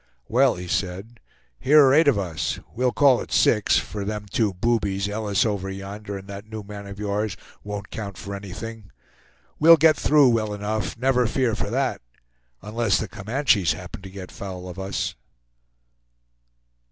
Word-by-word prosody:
"Well!" 130 +2 +3
he 90 0 -7
said, 95 +6 -3 0.4
"here 145 +2 +6
are 130 - +5
eight 160 +2 +5
of 135 -7 +4
us; 90 -6 -2
we'll 125 +2 +1
call 135 -2 +4
it - - -9
six 105 -2 +3
for 105 -1 -3
them 105 +1 -4
two 110 -4 +1
boobies, 100 -1 0
Ellis 105 +2 0
over 100 -3 -2
yonder, 100 +1 -6
and 95 0 -11
that 100 +2 -9
new 110 -1 -6
man 100 0 -9
of 100 0 -9
yours, 105 0 -2 0.3
won't 105 0 -6
count 100 -3 -6
for 100 -1 -7
anything. 100 +2 -8 0.7
We'll 165 +2 +8
get 155 0 +5
through 145 -2 +4
well 110 -3 0
enough, 105 +1 -3
never 125 0 +2
fear 125 0 0
for 100 - -3
that, 130 +3 -1 0.6
unless 105 -2 +1
the 110 - -3
Comanches 105 - +1
happen 90 +3 -9
to 95 - -9
get 95 -1 -9
foul 90 -2 -7
of 90 +1 -8
us." 95 +1 -2
105 Hz, 165 wpm, -24 LUFS, 100-120 Hz, 0.7 s, We'll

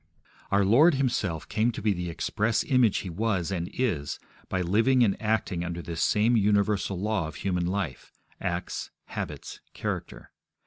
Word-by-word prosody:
Our 100 0 +3
Lord 145 - +6
Himself 120 - -1
came 110 +3 +1
to - - -6
be 105 -2 +3
the 90 -1 -4
express 105 +6 0
image 125 -6 +3
He - - -4
was 100 -1 -1
and 85 -2 -2
is 85 - -1 0.3
by 95 - 0
living 115 +8 +3
and 100 -4 +3
acting 110 -5 0
under 85 -1 -4
this 85 -1 -4
same 110 +3 +3
universal 100 -2 +2
law 105 -4 0
of 80 - -9
human 90 -1 -1
life 90 -8 -3 0.3
acts, 85 +1 -3 0.2
habits, - - -6 0.2
character. - - -5
100 Hz, 160 wpm, -27 LUFS, 90-110 Hz, 0.3 s, Lord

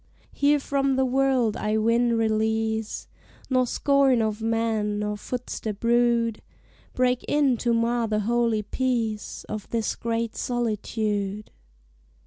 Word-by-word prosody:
Here 290 +1 +3
from 275 -1 0
the 265 0 +2
world 255 -4 +2
I 215 +1 -1
win 230 +2 +2
release, 220 0 -1 0.4
Nor 255 -1 +3
scorn 275 -2 +3
of 220 -1 -1
men, 225 -2 0
nor 210 0 -2
footstep 220 -2 -5
rude, 235 -1 +2 0.5
Break 250 0 +1
in 285 -4 +3
to 240 +1 0
mar 230 0 +1
the 215 -1 0
holy 230 0 +1
peace 225 -2 -2
Of 215 -2 -6
this 230 -2 -1
great 230 -1 -2
solitude. 215 -3 -2
230 Hz, 120 wpm, -25 LUFS, 215-250 Hz, 0.5 s, Here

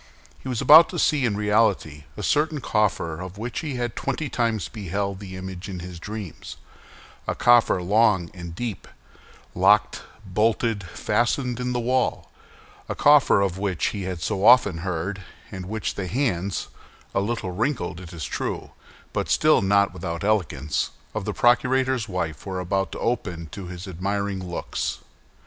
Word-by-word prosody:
He 130 - -7
was 125 -3 -1
about 160 +3 +9
to 180 - -5
see 150 -4 +2
in 105 -4 0
reality 105 -8 +1
a - - -5
certain 150 0 +1
coffer 100 -9 0
of 95 +1 -8
which 115 +3 -4
he 150 -5 -4
had 120 -2 -3
twenty 155 -3 -2
times 115 -6 0
beheld 100 -2 -3
the 95 -2 -8
image 95 0 -7
in 90 -2 -5
his 90 -1 -8
dreams—a 105 -2 -9
coffer 120 -6 +4
long 100 -3 +3
and 85 -2 -8
deep, 115 0 -5 0.7
locked, 100 +4 +3 0.2
bolted, 110 +2 +1
fastened 120 +7 -1
in 125 0 -2
the 125 - 0
wall; 125 +1 0 0.6
a - - -2
coffer 145 -8 +5
of 95 -1 -1
which 95 -5 0
he 100 - -5
had 90 -3 -4
so 95 - -1
often 105 -7 +6
heard, 90 +2 -3 0.3
and 95 -2 -6
which 110 +1 -3
the 95 -2 -4
hands—a 100 -4 -3
little 105 -3 -2
wrinkled, 110 - -2
it 90 -2 -10
is 80 -6 -5
true, - - -4 0.4
but - - -2
still - - +4
not 100 0 +3
without 85 -1 -5
elegance—of 85 -9 -2
the - - -1
procurator's 125 -1 +2
wife 85 -5 -3
were 95 -1 -3
about 95 0 -1
to - - -5
open 90 -9 -2
to 100 -3 -7
his 90 +2 -8
admiring 100 +2 -2
looks. 90 -1 -3
100 Hz, 155 wpm, -24 LUFS, 90-120 Hz, 0.7 s, about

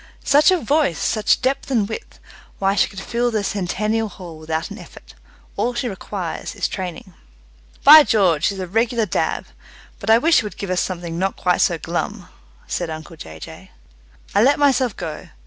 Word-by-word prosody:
"Such 290 +2 +5
a 370 - +4
voice! 285 - +1
Such 215 +3 +1
depth 265 +2 -1
and 225 -7 +1
width! 220 - -8 0.4
Why, 195 0 +1
she 200 - +3
could 195 - -9
fill 240 +4 -1
the 215 -3 -1
Centennial 210 +3 -1
Hall 175 -5 -11
without 160 +1 -3
an - - -8
effort. - - -14 0.4
All 245 0 -1
she 245 +1 -2
requires 190 -4 -5
is - - -1
training." 185 0 -6 0.7
"By 305 +2 +11
George, 185 - +2
she's 200 - 0
a 185 - -3
regular 225 +4 0
dab! 185 - -1 0.5
But - - -5
I 225 - +7
wish 320 +7 +4
she - - +3
would 210 - -7
give 200 -2 -4
us 180 - +1
something 175 -2 -4
not 190 +1 -1
quite 180 -1 +1
so 170 - +2
glum," 175 +4 -4 0.4
said 175 -2 -3
uncle 160 +1 -8
Jay 80 - -10
Jay. - - -11 0.6
I 200 - +4
let 275 +5 +4
myself 265 -6 +2
go. 155 - -6
200 Hz, 185 wpm, -20 LUFS, 175-235 Hz, 0.7 s, By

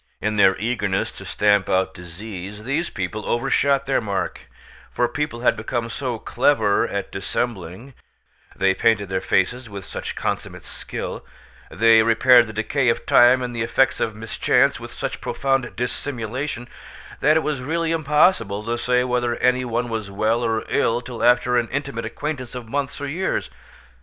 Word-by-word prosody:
In 105 +1 -1
their 95 -2 +5
eagerness 105 -4 -1
to - - -11
stamp 105 -2 +2
out 95 0 +1
disease, 95 +3 -8
these 140 +8 -1
people 95 +3 -4
overshot 135 +2 +1
their 135 -1 +1
mark; 100 -3 -4 0.4
for 120 - 0
people 150 -3 -3
had 125 - +3
become 115 +1 -3
so 125 0 -3
clever 110 -3 +2
at 100 -1 -4
dissembling—they 95 0 -4
painted 105 -1 +1
their 95 0 -1
faces 120 +6 0
with 100 -2 -8
such - - -6
consummate - - -4
skill—they 115 0 -1
repaired 120 +2 +5
the - - -7
decay 120 +4 0
of 115 - -1
time 125 +1 +6
and 120 -1 -4
the 115 - -2
effects 120 +3 +2
of 110 -2 -1
mischance 110 0 +1
with - - -9
such - - -5
profound 135 -3 -1
dissimulation—that 125 +4 -3
it 160 - 0
was 150 -4 -2
really 165 +4 -1
impossible 150 - +2
to 120 +2 -2
say 125 +1 +2
whether 125 -1 0
any 125 +1 +2
one 120 0 -2
was 110 -3 -4
well 110 +4 0
or 115 -1 -1
ill 115 +1 +1
till 120 -1 -6
after 125 0 +4
an 120 - -2
intimate 135 -5 -3
acquaintance 130 0 -5
of 120 -2 -7
months 140 +3 -3
or 145 - -4
years. 160 - -2
120 Hz, 155 wpm, -22 LUFS, 105-130 Hz, 0.4 s, time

